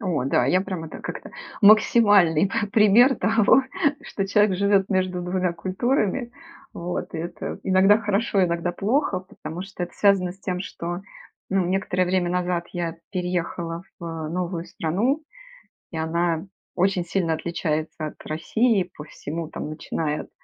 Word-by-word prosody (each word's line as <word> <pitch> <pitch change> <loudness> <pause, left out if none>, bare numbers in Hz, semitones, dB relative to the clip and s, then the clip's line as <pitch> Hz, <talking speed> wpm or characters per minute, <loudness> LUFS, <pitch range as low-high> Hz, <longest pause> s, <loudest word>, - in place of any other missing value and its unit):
О 175 - -1
да, 130 -2 +2
я 180 +7 +3
прям 185 -4 -4
это 160 - -8
как-то - - -7 0.3
максимальный 205 -5 +6
п 205 - -1
пример 225 +5 +6
того, 225 +4 +4 0.4
что 195 - -3
человек 205 -1 +3
живет 200 0 +3
между 185 -2 0
двумя 180 0 0
культурами. 215 +6 -1 0.4
Вот, 175 0 -5
и - - -2
это 170 +2 -5
иногда 195 +2 +5
хорошо, 205 -2 +1
иногда 170 0 -1
плохо, 205 +1 0
потому 175 -2 -8
что 190 -1 -7
это 175 - -13
связано 195 -3 +3
с 190 - -22
тем, 185 -2 -2
что 175 -1 -5 0.5
ну 190 -2 +2
некоторое 185 0 0
время 180 -1 0
назад 180 -1 -1
я 170 -2 -3 0.2
переехала 175 -2 -3 0.2
в - - -7 0.2
новую 175 0 -3
страну, 215 - -1 0.7
и 165 - -5
она 165 +1 0 0.3
очень 185 -1 +1
сильно 170 -2 0
отличается 160 -1 -2
от - - -9
России 190 +5 +1
по 150 - -8
всему, 160 +2 -6
там - - -5
начиная 155 0 -3
от - - -18
180 Hz, 150 wpm, -24 LUFS, 170-200 Hz, 0.7 s, максимальный